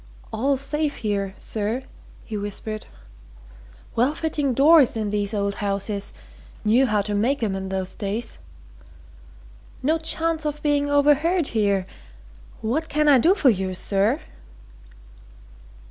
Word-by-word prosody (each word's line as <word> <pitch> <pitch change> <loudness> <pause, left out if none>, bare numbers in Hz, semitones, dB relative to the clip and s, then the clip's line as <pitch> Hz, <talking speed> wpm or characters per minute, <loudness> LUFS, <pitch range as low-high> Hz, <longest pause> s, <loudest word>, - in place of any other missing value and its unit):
"All 270 +4 +1
safe, 295 +2 -1
here, 200 -3 -2
sir!" 220 +4 -3 0.4
he 220 - -6
whispered. 210 +1 -5 1.1
"Well 255 +6 +2
fitting 295 -5 -1
doors 285 -3 +6
in 210 -2 -2
these 205 -1 -1
old 200 -2 -1
houses 200 0 -2 0.5
knew 245 +5 +4
how 210 -3 +1
to 210 - -3
make 240 +6 +1
'em 200 -3 0
in 190 0 -4
those 190 -1 -3
days. 210 +3 -3 1.4
No 315 +4 +2
chance 325 0 +1
of 300 0 -4
being 290 -1 +1
overheard 295 +4 +3
here 200 -4 +1 0.8
what 285 +9 -1
can 300 0 +1
I 280 -3 +7
do 345 +10 +4
for 280 -10 +4
you, 190 -2 -2
sir?" 205 - +1
235 Hz, 130 wpm, -23 LUFS, 205-295 Hz, 1.4 s, I